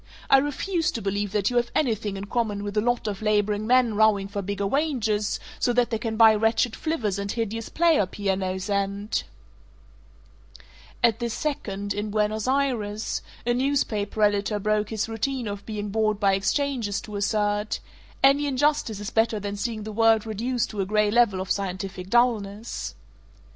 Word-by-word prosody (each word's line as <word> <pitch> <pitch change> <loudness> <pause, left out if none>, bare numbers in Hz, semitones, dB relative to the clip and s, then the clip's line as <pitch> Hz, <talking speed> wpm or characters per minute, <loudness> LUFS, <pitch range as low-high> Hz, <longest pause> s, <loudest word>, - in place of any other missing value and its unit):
I 270 - +8
refuse 320 +5 -1
to - - -3
believe 200 0 -1
that 205 +1 +1
you 245 - 0
have 240 0 +1
anything 220 -8 0
in 195 - -5
common 210 -2 -1
with 205 0 -5
a 210 - +3
lot 240 0 0
of 205 -1 -4
laboring 210 0 +1
men 250 -2 +4
rowing 210 -2 +3
for 200 0 -4
bigger 200 +1 -3
wages 225 -5 0 0.2
so 245 - +2
that 245 -1 +2
they 225 - 0
can 220 -1 -3
buy 225 -1 +8
wretched 225 +2 +1
flivvers 220 - -2
and 200 0 -3
hideous 225 -1 -3
player 320 - +3
pianos 190 -1 -2
and 200 +1 -1 0.9
" - - -24
At 230 -1 +4
this 235 -2 -2
second, 200 -9 -3
in 210 +1 -3
Buenos 215 +1 0
Ayres, 240 -6 -1 0.2
a 240 - +2
newspaper 240 -6 0
editor 205 0 +2
broke 210 0 0
his 220 -1 -2
routine 235 +2 -2
of 200 -1 -6
being 210 -2 -4
bored 215 0 +1
by 200 -2 +3
exchanges 220 0 0
to 210 - -9
assert, 205 +1 0 0.4
"Any 280 +2 +5
injustice 280 -5 +1
is 205 +2 -5
better 225 -1 +2
than 205 0 -4
seeing 215 +1 -3
the 215 - -6
world 225 0 +3
reduced 230 +2 -2
to 210 -2 -2
a - - 0
gray 210 0 +2
level 230 -4 +3
of 190 - -3
scientific 190 -1 -3
dullness." 225 -2 0
215 Hz, 175 wpm, -25 LUFS, 205-240 Hz, 0.9 s, I